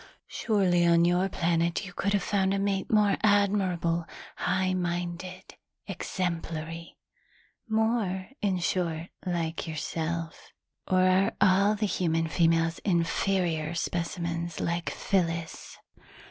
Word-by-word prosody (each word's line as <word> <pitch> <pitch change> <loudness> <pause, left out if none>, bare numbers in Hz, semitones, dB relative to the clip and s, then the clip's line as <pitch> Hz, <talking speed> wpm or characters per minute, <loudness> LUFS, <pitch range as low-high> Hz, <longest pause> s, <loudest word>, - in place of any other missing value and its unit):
"Surely 190 -6 +1
on 170 0 +5
your 180 +2 +2
planet 170 +1 0
you 180 - -9
could 200 +3 -1
have 200 -2 +1
found 195 -1 +1
a - - 0
mate 195 -1 -1
more 210 -2 +4
admirable, 195 -5 +2 0.3
high 185 0 0
minded, 180 +1 -4 0.3
exemplary 165 -2 -4 0.7
more, 220 -4 0
in 195 -3 +1
short, 170 -1 -1 0.2
like 165 -2 -2
yourself. 165 +1 -4 0.4
Or 185 0 +3
are 185 +1 +3
all 200 +2 +4
the 210 0 -1
human 165 -4 0
females 165 0 +2
inferior 170 -2 0
specimens 170 0 -3
like 170 0 -1
Phyllis?" 165 -4 -2
175 Hz, 110 wpm, -28 LUFS, 165-195 Hz, 0.7 s, on